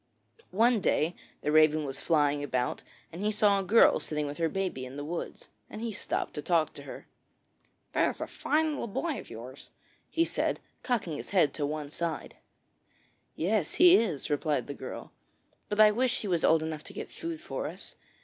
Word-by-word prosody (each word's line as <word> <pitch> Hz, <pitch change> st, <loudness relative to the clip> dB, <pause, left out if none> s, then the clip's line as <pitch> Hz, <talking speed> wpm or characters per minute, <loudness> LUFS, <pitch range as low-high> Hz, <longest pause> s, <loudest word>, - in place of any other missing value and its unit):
One 230 Hz, +3 st, +3 dB
day 160 Hz, 0 st, +1 dB, 0.3 s
the 150 Hz, -, 0 dB
Raven 155 Hz, 0 st, +5 dB
was 135 Hz, -1 st, -5 dB
flying 145 Hz, -3 st, +2 dB
about, 125 Hz, -3 st, -1 dB, 0.3 s
and 175 Hz, +4 st, -5 dB
he 210 Hz, -, +2 dB
saw 205 Hz, -1 st, +3 dB
a -, -, -2 dB
girl 220 Hz, +5 st, +5 dB
sitting 150 Hz, -1 st, -2 dB
with 145 Hz, +3 st, -6 dB
her 165 Hz, -1 st, +2 dB
baby 185 Hz, -7 st, -2 dB
in 130 Hz, +1 st, -8 dB
the 145 Hz, -, -5 dB
woods, 170 Hz, +3 st, -5 dB, 0.2 s
and -, -, -8 dB
he 230 Hz, 0 st, -3 dB
stopped 205 Hz, -, -3 dB
to 150 Hz, -, -4 dB
talk 165 Hz, 0 st, +1 dB
to -, -, -10 dB
her. -, -, -9 dB, 0.9 s
'That -, -, +3 dB
is -, -, -6 dB
a -, -, -2 dB
fine 315 Hz, +1 st, 0 dB
little 285 Hz, -, -3 dB
boy 305 Hz, +8 st, -2 dB
of -, -, -11 dB
yours,' 125 Hz, +4 st, -10 dB, 0.4 s
he 330 Hz, 0 st, +2 dB
said, -, -, -1 dB, 0.2 s
cocking 205 Hz, -, -1 dB
his -, -, -7 dB
head 180 Hz, -7 st, +3 dB
on 145 Hz, -, 0 dB
one 150 Hz, -1 st, -4 dB
side. 170 Hz, 0 st, -4 dB, 1.0 s
'Yes, 185 Hz, 0 st, 0 dB
he 355 Hz, +1 st, +8 dB
is,' 165 Hz, -, 0 dB
replied 145 Hz, -3 st, 0 dB
the 140 Hz, -, -6 dB
girl; 130 Hz, -, -8 dB, 0.6 s
'but 205 Hz, -, -2 dB
I 215 Hz, -1 st, +8 dB
wish 250 Hz, +3 st, +1 dB
he 210 Hz, -, -4 dB
was 175 Hz, -4 st, 0 dB
old 160 Hz, -1 st, +4 dB
enough 155 Hz, -1 st, -4 dB
to -, -, -10 dB
get -, -, -7 dB
food 330 Hz, -1 st, -5 dB
for -, -, -4 dB
us. -, -, -8 dB
165 Hz, 195 wpm, -29 LUFS, 150-215 Hz, 1.0 s, he